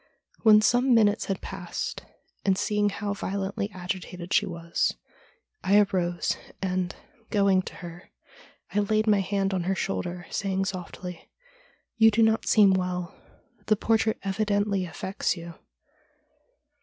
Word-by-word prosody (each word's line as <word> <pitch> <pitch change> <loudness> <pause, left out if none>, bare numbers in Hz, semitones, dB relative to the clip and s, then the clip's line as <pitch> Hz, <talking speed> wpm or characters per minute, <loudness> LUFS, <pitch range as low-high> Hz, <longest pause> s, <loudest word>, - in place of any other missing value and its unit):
When 215 -2 +7
some 245 +3 +4
minutes 210 -2 +3
had 195 -2 -3
passed, 195 -3 -5 0.4
and 190 -1 +2
seeing 210 0 +1
how 205 0 -3
violently 200 0 -3
agitated 180 -1 -5
she 205 - +3
was, 170 -1 -1 0.7
I 200 +2 +4
arose, 180 -4 +1 0.2
and, 185 -1 -2 0.3
going 200 -3 +3
to - - -9
her, 175 0 -10 0.6
I 205 - +2
laid 215 +1 +1
my 210 -2 +4
hand 195 0 -1
on 180 -2 -1
her 190 +1 +1
shoulder, 175 - -3
saying 195 -1 -1
softly: 180 -2 -6 0.3
' - - -36
You 225 0 +8
do 225 +1 +3
not 220 0 +2
seem 205 -3 +6
well. 180 -2 -2 0.5
The 215 - +4
portrait 220 +1 +1
evidently 200 -1 0
affects 180 +3 -2
you.' 170 0 -8
195 Hz, 135 wpm, -27 LUFS, 180-210 Hz, 0.7 s, You